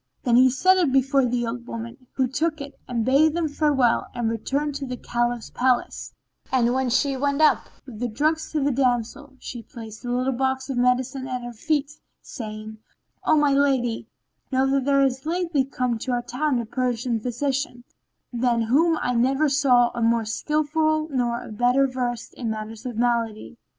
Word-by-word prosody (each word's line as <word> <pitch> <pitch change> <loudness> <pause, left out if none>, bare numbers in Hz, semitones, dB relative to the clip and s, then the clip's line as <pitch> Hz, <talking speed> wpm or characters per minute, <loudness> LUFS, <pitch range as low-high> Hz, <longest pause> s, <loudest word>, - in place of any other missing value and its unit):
Then 240 -3 +3
he 255 +1 +7
set 370 +9 +3
it 340 -7 +2
before 270 0 +3
the 240 0 -1
old 235 +1 -5
woman 235 +3 -8
who 260 -1 +1
took 310 +4 -1
it 280 0 -7
and 235 -3 -1
bade 295 +5 +4
them 340 -2 0
farewell 285 -5 +2
and 235 -2 0
returned 280 +6 -2
to 275 - -5
the 250 0 -5
Caliph's 240 -1 -2
palace, 250 -1 0 0.4
and 245 -2 +2
when 260 -1 0
she 270 +3 +1
went 280 +2 0
up 305 -4 +3 0.2
with 240 -6 -10
the 245 - -1
drugs 310 +7 -1
to 305 -3 0
the 285 - +2
damsel 260 +2 -1
she 240 - -7
placed 225 -3 -10
the 245 - -6
little 255 +2 0
box 265 +2 -1
of 260 - -3
medicine 250 +1 +1
at 250 -1 -4
her 240 0 -6
feet, 290 +4 -1 0.3
saying, 215 -2 -8 0.5
"O 310 - +4
my 290 -2 +3
lady, 265 -5 +1 0.4
know 260 0 +2
that 275 -1 +1
there 275 -1 +4
is 265 +2 -1
lately 335 -4 +1
come 250 -3 -2
to 255 +2 -2
our 240 0 -1
town 260 +2 -1
a 235 - -3
Persian 245 0 -1
physician, 255 +2 -2 0.5
than 235 -1 +1
whom 315 +8 +3
I 250 - 0
never 270 +5 +2
saw 255 -4 +4
a 240 - -4
more 230 0 +2
skilful 310 +5 0
nor 240 -2 -1
a - - -10
better 245 +5 +3
versed 250 -3 -3
in 235 -3 -4
matters 220 +2 -5
of 240 -3 -6
malady. 235 -1 -1
255 Hz, 185 wpm, -24 LUFS, 240-280 Hz, 0.5 s, he